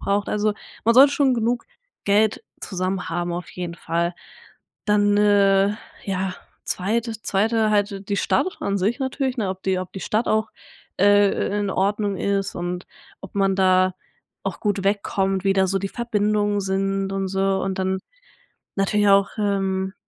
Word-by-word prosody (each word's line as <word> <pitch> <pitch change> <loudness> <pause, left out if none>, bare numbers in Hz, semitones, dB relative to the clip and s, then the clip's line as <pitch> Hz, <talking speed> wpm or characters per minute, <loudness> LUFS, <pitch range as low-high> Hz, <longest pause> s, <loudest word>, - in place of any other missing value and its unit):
braucht. 200 0 0
Also, 210 0 0 0.3
man 230 +1 +4
sollte 275 +2 +8
schon 270 -3 +3
genug 235 +1 0 0.4
Geld 205 +1 +2 0.2
zusammen 185 0 -3
haben 175 0 -2
auf 175 +1 -5
jeden 175 -2 -5
Fall. 170 +1 -1 0.7
Dann 205 -1 +3
äh, 200 -1 +4 0.3
ja, 190 -1 -2 0.3
zweit 215 +5 -1 0.2
2te 215 +2 +1
halt 205 -1 0
die 200 - 0
Stadt 195 - 0
an 200 0 -1
sich 215 +8 0
natürlich, 265 0 -1
ne, 200 -4 0
ob 190 0 -7
die 190 -1 +1
ob 185 - -7
die 195 - -7
Stadt 220 +4 0
auch, 220 0 +1 0.5
äh, 205 0 +3
i - - 0
in 200 -1 -1
Ordnung 200 +1 0
ist 200 0 -1
und 175 +1 -4 0.4
ob 195 - -11
man 195 -1 +2
da 185 -1 +3 0.5
auch - - -3
gut 205 -2 0
wegkommt, 195 -1 0
wie 195 - +4
da 190 -1 +3
so 195 - +1
die 195 - -2
Verbindungen 210 -3 0
sind 195 0 -1
und 195 -1 -2
so 195 0 0
und 190 -1 -2
dann 190 0 -1 0.8
natürlich 205 +1 +2
auch, 200 0 +5
ähm, 195 -1 -1
195 Hz, 165 wpm, -23 LUFS, 190-210 Hz, 0.8 s, sollte